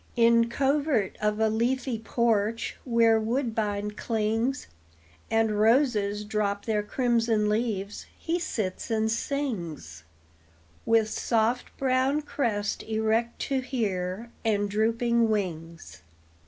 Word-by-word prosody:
In 230 Hz, 0 st, +4 dB
covert 275 Hz, -4 st, +1 dB
of 210 Hz, 0 st, 0 dB
a 220 Hz, -, +3 dB
leafy 240 Hz, +2 st, 0 dB
porch, 225 Hz, -1 st, 0 dB
Where 230 Hz, -2 st, +4 dB
woodbine 220 Hz, -3 st, -1 dB
clings, 225 Hz, +4 st, -1 dB, 0.6 s
And 220 Hz, -2 st, +1 dB
roses 215 Hz, -3 st, +2 dB
drop 205 Hz, -1 st, -1 dB
their 215 Hz, -2 st, +1 dB
crimson 230 Hz, -1 st, +1 dB
leaves, 210 Hz, -2 st, -2 dB
He 340 Hz, +2 st, -2 dB
sits 215 Hz, -, -3 dB
and 220 Hz, -1 st, +1 dB
sings; 175 Hz, -, -3 dB, 0.8 s
With 225 Hz, -1 st, +4 dB
soft 230 Hz, +2 st, 0 dB
brown 265 Hz, +3 st, +1 dB
crest 220 Hz, -8 st, -1 dB
erect 220 Hz, +2 st, 0 dB
to 270 Hz, -1 st, 0 dB
hear, 215 Hz, -4 st, -3 dB
And 205 Hz, -3 st, +1 dB
drooping 230 Hz, +2 st, +2 dB
wings. 170 Hz, -, -4 dB
225 Hz, 105 wpm, -27 LUFS, 210-240 Hz, 0.8 s, In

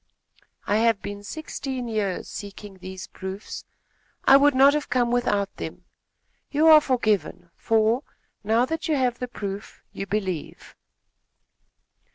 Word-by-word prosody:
"I 205 Hz, -, +2 dB
have 225 Hz, -2 st, +2 dB
been 205 Hz, 0 st, -6 dB
sixteen 265 Hz, -1 st, -5 dB
years 210 Hz, -5 st, -2 dB
seeking 200 Hz, -1 st, -9 dB
these 185 Hz, 0 st, -7 dB
proofs. 190 Hz, +2 st, -7 dB, 0.6 s
I 270 Hz, -, +8 dB
would 280 Hz, 0 st, +5 dB
not 275 Hz, +2 st, +7 dB
have 300 Hz, -1 st, -2 dB
come 245 Hz, -2 st, +1 dB
without 205 Hz, -5 st, 0 dB
them. -, -, -7 dB, 0.6 s
You 300 Hz, +2 st, +2 dB
are 310 Hz, -1 st, +9 dB
forgiven, 215 Hz, -9 st, 0 dB
for, 225 Hz, +2 st, +2 dB, 0.4 s
now 225 Hz, +4 st, +3 dB
that 325 Hz, +4 st, -3 dB
you 310 Hz, -, +2 dB
have 250 Hz, -3 st, 0 dB
the 250 Hz, -, -3 dB
proof, 205 Hz, -3 st, -7 dB
you 195 Hz, -, -5 dB
believe." 190 Hz, -6 st, -4 dB
225 Hz, 135 wpm, -25 LUFS, 200-260 Hz, 0.6 s, are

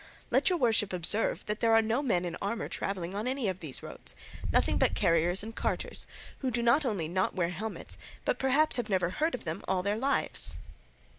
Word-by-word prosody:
Let -, -, +4 dB
your 360 Hz, -, +2 dB
worship 220 Hz, -, +2 dB
observe 180 Hz, +5 st, +1 dB
that 210 Hz, +1 st, -2 dB
there 225 Hz, -1 st, +4 dB
are 225 Hz, -, +7 dB
no 225 Hz, +5 st, +1 dB
men 205 Hz, -11 st, +1 dB
in 170 Hz, -1 st, -3 dB
armour 205 Hz, +3 st, -2 dB
travelling 185 Hz, -2 st, -3 dB
on 210 Hz, +4 st, -2 dB
any 260 Hz, -3 st, -1 dB
of 185 Hz, -1 st, -2 dB
these 155 Hz, -7 st, -4 dB
roads, -, -, -7 dB, 0.4 s
nothing -, -, +3 dB
but -, -, +3 dB
carriers 170 Hz, +3 st, +2 dB
and 225 Hz, +1 st, -7 dB
carters, -, -, -2 dB, 0.3 s
who 265 Hz, -, -1 dB
not 240 Hz, +5 st, +4 dB
only 205 Hz, -, -1 dB
do 170 Hz, -, -8 dB
not 185 Hz, 0 st, +1 dB
wear 170 Hz, -3 st, +1 dB
helmets, 210 Hz, +5 st, -5 dB, 0.3 s
but -, -, +1 dB
perhaps 270 Hz, +1 st, +3 dB
never 185 Hz, -3 st, +1 dB
heard 315 Hz, -, 0 dB
tell 250 Hz, -, -3 dB
of -, -, -15 dB
them 165 Hz, +4 st, -4 dB
all 180 Hz, -1 st, +1 dB
their 205 Hz, +2 st, 0 dB
lives." 275 Hz, +3 st, +2 dB
210 Hz, 210 wpm, -30 LUFS, 180-240 Hz, 0.4 s, are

